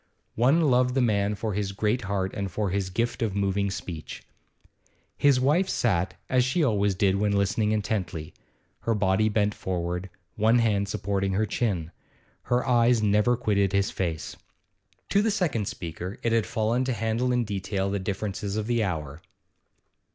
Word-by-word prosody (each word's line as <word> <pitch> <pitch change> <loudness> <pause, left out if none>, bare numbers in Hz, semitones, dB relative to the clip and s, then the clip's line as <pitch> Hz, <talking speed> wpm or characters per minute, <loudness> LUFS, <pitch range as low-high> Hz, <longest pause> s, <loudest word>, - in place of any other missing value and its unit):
One 135 +9 +3
loved 125 -4 +3
the - - +3
man 105 -3 +1
for 110 0 -3
his 100 0 -2
great 105 +5 0
heart 100 -1 -1
and 100 -2 -3
for 100 +1 -2
his 95 -1 -1
gift 115 +6 -2
of 105 -4 -1
moving 100 0 0
speech. 90 -4 -7 0.9
His 140 -3 +4
wife 155 +9 +2
sat, 90 -6 0
as 130 -1 +3
she 135 +7 +1
always 105 -6 +2
did 95 0 +2
when 105 0 +1
listening 100 +2 +1
intently, 95 -7 -2 0.5
her 115 - 0
body 105 +1 +2
bent 105 -1 +1
forward, 90 0 -3 0.3
one 110 +3 +3
hand 105 -4 +1
supporting 100 -1 -1
her 105 +3 +1
chin. 95 -7 -2 0.5
Her 125 +1 0
eyes 120 -2 +4
never 105 +4 +3
quitted 100 -4 +1
his 100 0 +1
face. 85 -4 -3 0.7
To 200 - +3
the 225 - +1
second 160 - 0
speaker 90 +3 -6
it 115 - +1
had 115 -1 +2
fallen 115 +2 0
to 130 - 0
handle 115 +3 0
in 125 -1 +2
detail 100 -1 -2
the 100 - -1
differences 100 +1 -3
of 110 - -1
the 120 -1 +1
hour. 80 -5 -4
105 Hz, 165 wpm, -26 LUFS, 95-115 Hz, 0.9 s, His